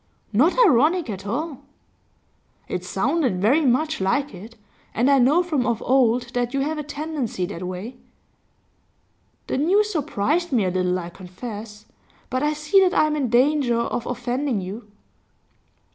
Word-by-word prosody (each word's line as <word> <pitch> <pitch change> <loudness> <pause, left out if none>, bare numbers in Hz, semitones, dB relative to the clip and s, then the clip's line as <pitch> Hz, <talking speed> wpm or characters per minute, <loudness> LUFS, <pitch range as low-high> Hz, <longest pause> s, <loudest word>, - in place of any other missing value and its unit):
'Not 295 - +3
ironic 305 - +3
at 195 0 -7
all.' 285 +5 -3 1.1
'It 180 - -4
sounded 245 - 0
very 260 - +3
much 295 +1 +1
like 245 +8 0
it, 215 +6 -11 0.4
and 250 +5 +3
I 275 - +5
know 290 +8 +4
from 300 -8 -1
of 235 -2 0
old 250 -2 +2
that 245 +1 -1
you 275 - +1
have 305 +2 -2
a - - -3
tendency 290 - -3
that 170 - -7
way.' 185 +7 -6 1.5
'The - - -2
news 405 +8 +2
surprised 310 - -1
me 230 -7 +2
a 185 - 0
little, 180 0 0
I 175 -1 -6
confess. 210 +3 -9 0.5
But 255 - 0
I 300 +1 +1
see 305 +6 +3
that 375 -1 +3
I - - +4
am 305 0 0
in 275 -5 -1
danger 255 0 +3
of 235 0 -2
offending 250 0 -2
you. 205 +4 -7
250 Hz, 160 wpm, -23 LUFS, 210-300 Hz, 1.5 s, I